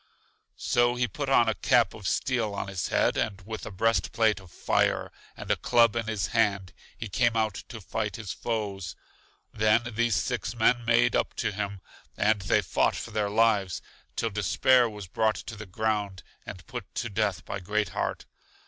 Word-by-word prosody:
So 120 0 +2
he 125 0 +1
put 140 +5 -4
a 120 -4 +4
cap - - +4
of - - -6
steel 115 -6 0
on 100 - -4
his 95 -4 -2
head, - - +2
and 100 -3 -1
with 110 +3 -7
a - - -6
breast 115 +4 +1
plate 110 -3 +2
of 95 -2 -15
fire, - - +1 0.3
and - - -4
a - - +4
club 120 -2 +3
in 115 -2 -2
his 105 -4 -1
hand, 100 -5 +1 0.2
he 115 - -5
came 115 +3 +1
out 110 -2 +1 0.2
to 115 - -7
fight 105 0 -3
his 110 -4 -5
foes. 100 -7 -3 0.6
Then 110 +2 +2
these 120 -1 +1
six 115 - -2
men 120 +1 +2
made 115 - +4
up - - 0
to - - -1
him, 100 -1 -4 0.4
and 110 -1 +2
they 105 +3 +2
fought - - +1
for - - -6
their 105 -1 0
lives, 105 -4 +2 0.3
till 115 - -1
Despair 120 +5 +3
was 105 -2 -8
brought 110 +4 +1
to 115 - -7
the 110 -1 -9
ground 105 -1 -2 0.2
and 90 - -8
put 120 -5 -8
to 120 - -2
death 100 -4 -1
by - - -4
Great 105 +3 -1
heart. - - -3
110 Hz, 185 wpm, -27 LUFS, 100-115 Hz, 0.6 s, a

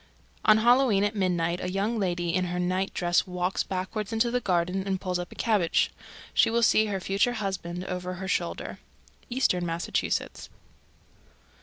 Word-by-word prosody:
On 215 0 +7
Halloween 240 -2 +4
at 205 +1 0
midnight 175 -3 0
a 180 - -2
young 205 +4 -1
lady 175 -3 -1
in 185 +1 +1
her 180 0 -3
night 185 +2 0
dress 175 0 +1
walks 180 +1 -1
backward 195 +3 -3
into 225 +1 +1
the 250 - +1
garden 180 -3 0
and 190 -1 0
pulls 180 -1 -2
up 175 - -6
a - - -11
cabbage. 210 -8 +2 0.4
She 230 - +4
will 235 +1 +1
see 220 -1 +4
her 200 -2 -2
future 195 +6 +1
husband 185 -5 -4
over 180 0 -4
her 190 +1 -6
shoulder. - - -2 0.5
_Eastern 240 -8 +2
Massachusetts. 170 0 -2
190 Hz, 165 wpm, -27 LUFS, 180-215 Hz, 0.5 s, On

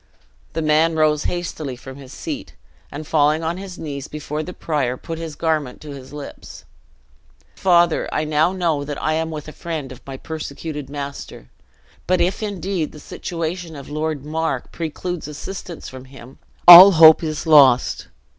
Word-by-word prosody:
The 160 - -2
man 155 +2 +2
rose 155 -1 +2
hastily 160 -6 -4
from 130 +2 -11
his 135 -2 -12
seat, - - -7 0.4
and 150 +2 -7
falling 155 +1 +2
on 165 +2 -2
his 190 -2 -8
knees 145 -3 -6
before 150 0 -5
the 175 - -7
prior, 140 -8 -2
put 165 +4 -7
his 165 -2 -6
garment 155 -5 -2
to 150 - -9
his 135 -2 -10
lips: 145 -1 -10 0.9
"Father, 175 -3 +2
I 155 - -1
now 155 +2 +1
know 170 -6 -1
that 145 0 -6
I 155 - 0
am 160 +1 -1
with 155 -2 -7
a - - -7
friend 155 -5 -6
of 130 - -11
my 135 -1 -7
persecuted 150 -1 -7
master! 140 -1 -8 0.6
But 185 0 +2
if, 180 +5 0
indeed, 195 -5 -3
the 150 - -11
situation 165 +2 -5
of 140 -2 -10
Lord 155 -2 -3
Mar 160 +2 -2
precludes 170 +1 -5
assistance 170 +3 -8
from 130 0 -10
him, 130 -1 -14 0.3
all 180 +3 +12
hope 160 -1 +8
is 155 +1 -4
lost! 140 -6 +5
155 Hz, 165 wpm, -20 LUFS, 145-165 Hz, 0.9 s, all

